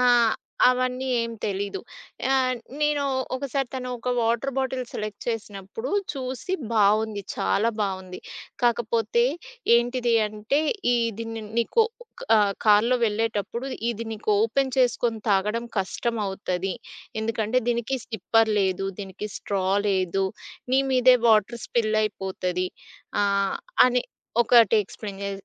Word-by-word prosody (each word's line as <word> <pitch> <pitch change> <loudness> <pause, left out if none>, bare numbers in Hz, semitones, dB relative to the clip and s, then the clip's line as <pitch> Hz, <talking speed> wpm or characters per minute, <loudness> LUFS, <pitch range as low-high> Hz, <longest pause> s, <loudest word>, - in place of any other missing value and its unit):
ఆహ్, 240 -2 +5 0.3
అవన్నీ 255 +1 0
ఏం 230 0 -1
తెలీదు. 200 0 -2 0.5
ఆహ్, 255 -1 +2 0.3
నేను 295 -1 +2 0.3
ఒకసారి 270 -1 -2
తను 255 -1 -4
ఒక 250 +2 -2
వాటర్ 235 +4 0
బాటిల్ 260 -1 -1
సెలెక్ట్ 210 -1 -5
చేసినప్పుడు 210 - -5 0.2
చూసి 265 +7 -4 0.2
బావుంది. 215 0 +2
చాలా 200 - +1
బావుంది. 185 -2 -4 0.4
కాకపోతే 235 0 +2 0.5
ఏంటిది 240 0 +1
అంటే, 215 +7 -1 0.3
ఈ - - +3 0.2
దీని 225 -1 -5 0.2
నీకు 445 - +3 0.5
ఆహ్, 205 -1 +3
కార్‌లో 225 +4 +5
వెళ్ళేటప్పుడు 225 +3 -2 0.2
ఇది 230 0 -5
నీకు 215 0 -3
ఓపెన్ 265 +3 +1
చేసుకొని 240 -3 +2
తాగడం 210 +4 +1
కష్టమవుతది. 195 -2 -2 0.5
ఎందుకంటే, 220 +2 0
దీనికి 240 +3 -1
సిప్పర్ 225 +1 +2
లేదు. 190 0 0
దీనికి 195 +1 -6
స్ట్రా 195 -2 -2 0.2
లేదు. 190 0 +1 0.5
నీ 265 - +5
మీదే 255 -1 +6
వాటర్ 220 +2 +3
స్పిల్ 215 -2 +1
అయిపోతది. 185 -3 -2 0.5
ఆహ్, 200 -1 +1 0.3
అని 250 0 +2 0.4
ఒకటి 230 -2 +6
ఎక్స్‌ప్లెయిన్ 200 0 -8
చే 200 - -2
225 Hz, 115 wpm, -25 LUFS, 200-245 Hz, 0.5 s, మీదే